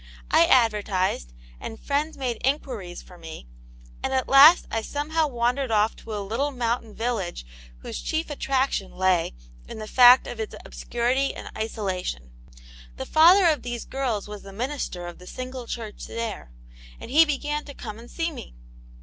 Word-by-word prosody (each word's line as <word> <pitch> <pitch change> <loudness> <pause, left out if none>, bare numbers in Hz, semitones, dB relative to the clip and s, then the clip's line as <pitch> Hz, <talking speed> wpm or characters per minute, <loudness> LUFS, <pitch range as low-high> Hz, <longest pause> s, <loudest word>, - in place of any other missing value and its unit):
I 170 - +6
advertised, 205 - +2 0.3
and 225 - -7
friends 295 +3 -1
made 250 -4 -3
inquiries 245 -10 -2
for 180 -1 -15
me, 160 - -9 0.6
and - - -2
at 260 - 0
last 285 +6 +8
I 225 - 0
somehow 305 +5 -1
wandered 250 +1 0
off 215 0 +2
to 220 -1 -7
a 200 -1 -4
little 240 +8 -1
mountain 235 -4 -2
village 225 - -3 0.4
whose - - -5
chief 315 -1 -2
attraction 270 -8 -1
lay 185 - +1 0.3
in - - -8
the 215 - -6
fact 250 +3 +7
of - - -7
its 440 - -4
obscurity 250 +3 -1
and - - -9
isolation.. 190 - -4 0.7
The - - -5
father 350 +5 +6
of 305 -5 +2
these 240 -1 -5
girls 245 -7 -2
was 210 -1 -8
the 195 - -11
minister 230 -5 -4
of 175 0 -9
the 180 - -13
single 255 +1 -7
church 225 -3 -6
there, 230 - -5 0.5
and - - -9
he 310 +4 +7
began 295 0 -2
to 285 - -10
come 215 -2 -8
and 235 +1 -13
see 335 0 -2
me. 255 - -10
240 Hz, 165 wpm, -25 LUFS, 210-275 Hz, 0.7 s, last